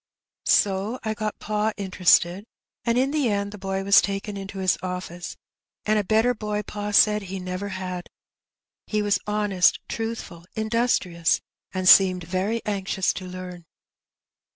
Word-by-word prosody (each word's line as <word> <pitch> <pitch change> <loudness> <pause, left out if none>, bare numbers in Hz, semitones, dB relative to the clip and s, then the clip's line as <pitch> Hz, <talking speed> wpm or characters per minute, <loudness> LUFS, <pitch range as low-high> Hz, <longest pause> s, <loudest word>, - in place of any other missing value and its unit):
So 200 +4 +2
I 220 -1 -1
got 215 0 -4
pa 215 +1 -1
interested, 185 -1 +3 0.4
and 235 0 +1
in 265 +2 +2
the 290 -5 +1
end 200 -1 -1
the 210 - -10
boy 195 0 -3
was 200 0 +6
taken 200 +1 -3
into 195 0 -7
his 190 -1 +2
office, 180 -1 -6 0.5
and 215 0 +2
a - - 0
better 220 +5 +3
boy 210 -2 -3
pa 205 0 -5
said 210 +1 +5
he 195 0 -6
never 185 +2 -4
had. 185 -2 -5 0.8
He 210 -1 0
was 205 -1 +2
honest, 205 -3 +2
truthful, 225 -7 -5
industrious, 220 -7 +1 0.3
and 185 -1 -2
seemed 185 -2 +7
very 190 +7 -2
anxious 195 -2 -1
to 185 - -7
learn. 180 -1 -8
200 Hz, 150 wpm, -24 LUFS, 185-215 Hz, 0.8 s, seemed